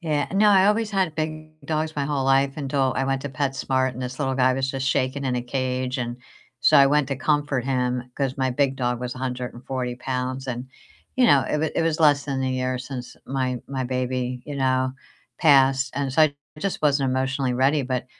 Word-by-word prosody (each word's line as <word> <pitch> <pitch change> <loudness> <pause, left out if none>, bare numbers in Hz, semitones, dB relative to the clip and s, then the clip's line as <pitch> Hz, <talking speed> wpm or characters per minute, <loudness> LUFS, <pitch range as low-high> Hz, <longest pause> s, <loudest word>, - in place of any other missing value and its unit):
Yeah, 150 -4 0
no, 210 +2 +4
I 195 -1 +6
always 215 +1 +2
had 190 -6 0
big 155 0 -5
dogs 155 0 -1
my 140 -2 -1
whole 140 -3 -1
life 135 +1 +2
until 135 -2 0
I 135 - +1
went 135 0 0
to 145 - -4
PetSmart 130 -1 0
and 125 - -8
this 125 +2 -5
little 135 -2 0
guy 130 -1 +3
was 135 0 -1
just 135 0 -3
shaking 130 +2 0
in 125 - 0
a 120 - -2
cage, 130 0 -2
and 120 -1 -3 0.4
so - - +5
I 140 - +7
went 150 0 +2
to 140 - -2
comfort 145 -2 0
him 125 -1 -1
'cause 135 -1 -2
my 130 -1 +1
big 135 +1 +1
dog 125 -2 -1
was 125 -1 -4
140 125 0 -4
pounds 130 +1 -3
and, 125 0 -4 0.5
you 255 -2 +5
know, 140 -7 +5
it - - -4
w 150 +1 0
it - - +1
was 165 -1 0
less 145 -2 +4
than 135 -2 -2
a 130 - 0
year 130 0 -1
since 125 -1 -7
my 130 -2 -2
my 130 -2 -3
baby, 125 0 -2
you 145 -1 -5
know, 130 -1 +1 0.5
passed, 135 -3 +4
and 140 -1 -1
so 155 +5 +4
I 150 -2 +3 0.2
just 195 +4 -2
wasn't 140 -3 +2
emotionally 130 0 0
ready, 135 +3 +2
but 130 -1 -2
135 Hz, 215 wpm, -24 LUFS, 130-145 Hz, 0.5 s, I